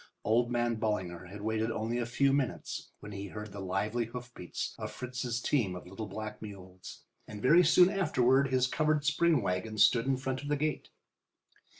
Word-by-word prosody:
Old 120 +3 +2
man 120 -1 +1
Ballinger 95 -6 -2
had 100 +3 -9
waited 110 +1 0
only 115 +2 -2
a 120 - -2
few 135 +3 +2
minutes 140 -3 -2
when 105 - -9
he 100 0 -6
heard 105 +1 -7
the 100 - -8
lively 105 +5 -1
hoofbeats 120 -5 -6
of - - -4
Fritz's 125 -2 -3
team 115 -8 0
of 90 - -8
little 95 +4 -7
black 110 +2 -6
mules, 95 -3 -10 0.2
and 105 - -8
very 165 +11 +6
soon 180 +3 +6
afterward 140 -7 +3
his 130 -1 +2
covered 150 +2 +1
spring 155 -3 +3
wagon 95 +4 -2
stood 115 +3 +5
in 135 -1 +2
front 130 0 -3
of 145 - -7
the 145 0 +1
gate. 155 +1 -2
115 Hz, 185 wpm, -31 LUFS, 105-135 Hz, 0.2 s, very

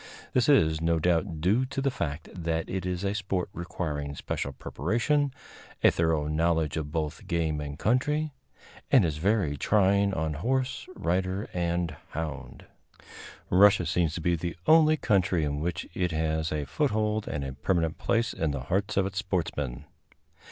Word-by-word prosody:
This 125 +2 +3
is, 80 - +4
no 85 0 +2
doubt, 80 -1 0
due 105 +9 +3
to 135 +1 -4
the 135 0 +1
fact 75 - -4
that 80 -2 -2
it 95 -1 -3
is 90 +1 -2
a 100 0 0
sport 100 -3 -2
requiring 75 -4 -4
special 70 - -3
preparation, 120 - 0 0.5
a - - +7
thorough 80 -2 +1
knowledge 80 0 +1
of 75 -2 -3
both 75 -1 -2
the - - -16
game 85 -5 -1
and 70 -1 -6
country, 145 - +1 0.6
and 125 -9 +6
is 75 -2 -1
very 95 -3 +1
trying 100 +3 +3
on 80 -1 -1
horse, 130 - -1
rider 95 +4 -1
and 85 -2 -1 0.2
hound. 80 -2 -5 0.9
Russia 100 +2 +6
seems 85 -3 +1
to 85 - -4
be 85 +2 +2
the 85 +1 -4
only 155 -1 +6
country 95 - +2
in 70 0 -2
which 80 0 -3
it 90 -2 -1
has 80 0 -1
a 75 -2 -2
foothold 110 - 0
and 75 - -3
a 65 - -5
permanent 80 +3 0
place 115 0 +1
in 80 - -1
the 70 -2 -2
hearts 95 +11 -1
of 95 - +3
its 95 0 -3
sportsmen. 80 -9 -2
85 Hz, 165 wpm, -28 LUFS, 80-100 Hz, 0.9 s, a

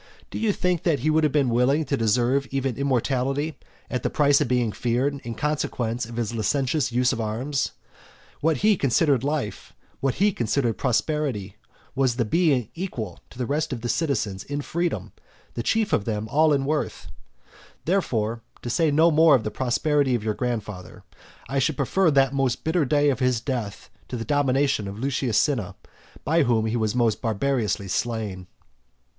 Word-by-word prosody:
Do - - -4
you 220 -2 +2
think 180 -3 0
that 155 -7 +1
he 155 +4 +2
would 160 +1 +3
have 150 - +3
been 140 -4 +2
willing 135 +6 +2
to 140 - 0
deserve 125 +4 +1
even 135 -2 -1
immortality, 135 +3 -1 0.3
at 125 - -3
the - - 0
price 145 -1 +3
of 145 - +1
being 120 -2 +1
feared 130 +6 -1
in 115 -1 -5
consequence 125 -5 -2
of 120 - -9
his 120 -1 -2
licentious 130 +4 0
use 125 +2 +2
of 115 - -3
arms? 125 +6 -2 0.7
What 160 0 +1
he 215 -1 +6
considered 140 -1 +2
life, 145 -6 -3 0.3
what 135 -1 0
he 205 +2 +3
considered 120 - -1
prosperity, 125 -6 -1 0.4
was 130 -2 +1
the 120 -2 0
being 135 - +2
equal 120 - -5
to - - -15
the 125 - -2
rest 150 +4 -1
of 120 -3 -4
the 120 - -3
citizens 115 - -1
in 145 +5 -4
freedom, 170 +2 -2 0.4
and 115 - -3
chief 220 - +1
of 100 - +1
them 110 -1 -2
all 155 +4 +4
in 140 -2 +2
worth. 150 +1 -2 0.7
Therefore, 115 - 0 0.2
to 120 - -3
say 160 +4 +2
no 160 +3 +4
more 160 -1 +6
of 120 - 0
the 110 - -3
prosperity 130 +3 +1
of 115 - -3
your 110 -1 0
grandfather, 105 -6 -5 0.4
I 135 0 -1
should 140 +1 0
prefer 170 +6 +2
that 135 -2 +3
most 135 -3 0
bitter 160 -1 +1
day 145 +1 +3
of 130 - -3
his 125 -3 +2
death 115 -5 -4 0.2
to 125 - -5
the 115 - -5
domination 140 -5 +1
of 100 +1 -7
Lucius 130 -2 0
Cinna, 130 - 0 0.5
by 165 +4 +3
whom 115 -5 +2
he 110 +1 -1
was 110 -1 0
most 115 -3 +1
barbarously 115 -3 -1
slain. 105 -3 -3
130 Hz, 180 wpm, -24 LUFS, 115-145 Hz, 0.7 s, he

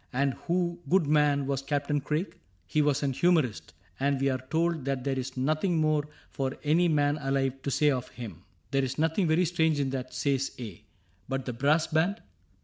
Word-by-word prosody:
— - - -39
' - - -34
And 140 -1 +2
who, 175 +4 -1
good 185 -2 +4
man. 145 -1 +3
Was 135 -1 -1
Captain 145 +1 -1
Craig? 150 +7 -2
' - - -38
— 95 - -36
' 85 - -40
He 155 - +4
was 145 -1 +1
an 135 -1 0
humorist; 155 -7 +1 0.3
And 140 0 +1
we 135 +1 +2
are 130 -1 -1
told 165 -1 +1
that 135 -2 -1
there 135 -1 -1
is 130 0 -5
nothing 155 +6 +1
more 155 -1 +2 0.2
For 135 0 -3
any 160 +4 +3
man 145 -1 +2
alive 135 -1 -1
to 140 - -3
say 150 +2 +3
of 130 -2 -2
him.' 120 -4 -9
— - - -37
' - - -38
There 135 -1 +2
is 130 0 -3
nothing 160 +4 +1
very 160 +3 +3
strange 160 -3 +1
in 135 -2 0
that,' 130 -1 -5
says 135 -2 0
A; 105 -5 -8 0.2
' 90 +3 -34
But 135 -1 -2
the 125 - -3
brass 145 +6 +2
band 170 +7 +1
140 Hz, 235 wpm, -28 LUFS, 135-155 Hz, 0.3 s, good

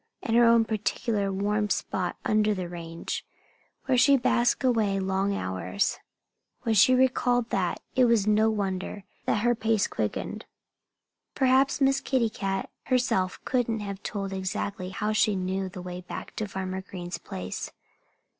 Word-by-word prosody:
And 225 - 0
her 240 - +6
own 230 -1 +5
particular 215 -1 -1
warm 205 +2 0
spot 185 -2 -1
under 215 0 +2
the 185 -2 -4
range, 170 -1 -5 0.6
where 255 -2 +3
she 280 +2 +6
basked 240 +1 +2
away 220 -6 +2
long 195 +1 0
hours! 95 - -1 0.6
When 225 - +1
she 220 +5 +6
recalled 245 -2 +2
that 180 -3 0
it 255 -1 +5
was 230 -4 +3
no 215 +1 +4
wonder 195 -1 -3 0.2
that 210 - +1
her 240 0 +4
pace 220 -2 +1
quickened. - - -3 0.9
Perhaps 265 +1 +3
Miss 270 0 +3
Kitty 250 -5 +1
Cat 195 -2 -3
herself 245 -8 +1
couldn't 235 -4 0
have 200 -1 -5
told 195 -2 -4
exactly 190 0 -3
how 210 +3 -2
she 215 -1 +3
knew 190 +1 -2
the 180 -1 -8
way 180 0 -6
back 180 - -8
to 215 - -2
Farmer 190 -1 -4
Green's 180 -2 -7
place. 90 0 -5
205 Hz, 150 wpm, -27 LUFS, 190-235 Hz, 0.9 s, her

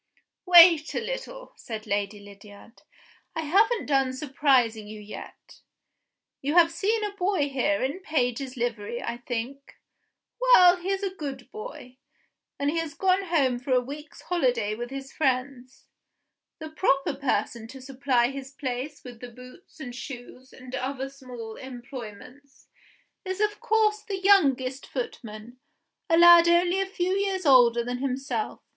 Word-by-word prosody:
"Wait 340 -3 +7
a - - +1
little," - - -7
said 220 -2 -8
Lady 205 0 -2
Lydiard, 205 +2 -15 0.5
"I 325 - -1
haven't 415 +9 +2
done 270 -2 +1
surprising 260 -6 +1
you 215 0 -9
yet. 210 0 -12 0.8
You 290 +4 -2
have 335 -1 +6
seen 425 +6 0
a 415 - -2
boy 365 -6 0
here 275 +2 0
in 275 +7 -2
a - - -13
page's 260 -6 -2
livery, 235 -1 -3
I 235 - -4
think? 245 +3 -6 0.7
Well, 365 -8 +7
he 360 +2 -6
is 390 0 -1
a 385 -1 -2
good 275 -7 -7
boy; 430 - -9 0.6
and 285 +1 0
he 330 - -1
has 325 -3 -5
gone 380 0 +1
home 275 -8 +1
for 260 +1 -2
a 250 - +5
week's 285 +4 -9
holiday 245 -11 0
with 240 +2 -6
his 270 0 -8
friends. 255 -2 -2 0.7
The 315 -1 -8
proper 275 -4 +1
person 235 -4 -2
to 265 +3 -11
supply 255 -2 0
his 270 -1 -8
place 275 0 -5
with 245 -3 -11
the 245 - -9
boots 250 +9 -15
and 250 -5 -7
shoes 250 +1 -10
and 255 -1 -13
other 265 +1 -3
small 250 -5 -10
employments, 255 +1 -11 0.5
is 375 0 -4
of 420 0 0
course 425 -1 +1
the 400 -3 -5
youngest 275 -9 +2
footman, 235 -1 -7 0.5
a 330 - +4
lad 345 0 +8
only 350 +2 +3
a 390 - -2
few 370 -1 -1
years 390 -2 -1
older 240 -4 +5
than 245 +1 -4
himself. 275 +9 -3
270 Hz, 150 wpm, -26 LUFS, 245-345 Hz, 0.8 s, lad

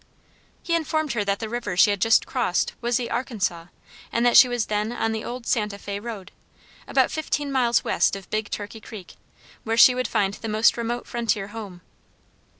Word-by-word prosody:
He 340 - -2
informed 315 -2 -1
her 215 -3 0
that 200 0 0
the 220 - -5
river 215 -5 -4
she 205 - +6
had 200 -2 -3
just 225 +2 +4
crossed 240 -9 -1
was 240 -1 +1
the 240 -2 -4
Arkansas, 210 -8 -2 0.5
and 235 +1 +1
that 240 - +4
she 255 - +9
was 245 -3 -1
then 210 +1 -1
on 225 -2 -1
the 220 -1 -3
old 245 0 -6
Santa 210 -4 -1
Fé 200 0 -6
road, 220 -6 -7 0.6
about - - +2
fifteen 295 -2 -2
miles 245 -3 +2
west - - +1
of 195 -2 -9
Big 215 -1 -2
Turkey 210 +2 -6
Creek, 210 -5 -10 0.5
where 225 0 -1
she 250 +2 +8
would 255 0 -2
find 195 -1 0
the 225 +2 -6
most 215 +2 +3
remote 235 +1 -3
frontier 215 -4 -2
house. 205 -5 -9
225 Hz, 195 wpm, -24 LUFS, 205-240 Hz, 0.6 s, she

